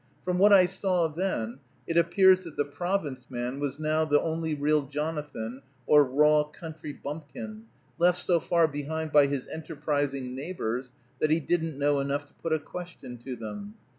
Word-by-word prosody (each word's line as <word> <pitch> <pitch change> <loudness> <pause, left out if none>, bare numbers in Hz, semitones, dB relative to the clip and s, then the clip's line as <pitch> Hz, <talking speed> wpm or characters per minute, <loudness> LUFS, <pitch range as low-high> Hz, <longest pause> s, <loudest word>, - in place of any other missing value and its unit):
From 180 0 0
what 205 +2 +7
I 190 -2 +8
saw 185 -2 +1
then, 150 -8 -2 0.3
it 165 - -3
appears 185 +2 +5
that 165 - -9
the 145 - +2
Province 150 -4 -3
man 125 +1 -3
was 145 -1 -2
now 155 0 +1
the 145 -2 +3
only 160 -1 -1
real 150 +1 +2
Jonathan, 145 -5 -4 0.2
or 150 -1 +7
raw 150 +3 +4
country 155 0 -8
bumpkin, 160 +11 -7 0.3
left 175 +1 +4
so 175 -2 +3
far 170 0 +3
behind 155 +2 -4
by 145 -1 +6
his 140 -2 -2
enterprising 145 -4 -2
neighbors 130 -4 -4 0.3
that 155 - +2
he 160 +2 +3
didn't 165 -1 -1
know 145 0 +2
enough 140 +1 -1
to 145 - -25
put 165 - -5
a 160 - +4
question 155 -6 -8
to 125 +2 -6
them. 205 - -7
150 Hz, 170 wpm, -28 LUFS, 140-170 Hz, 0.3 s, I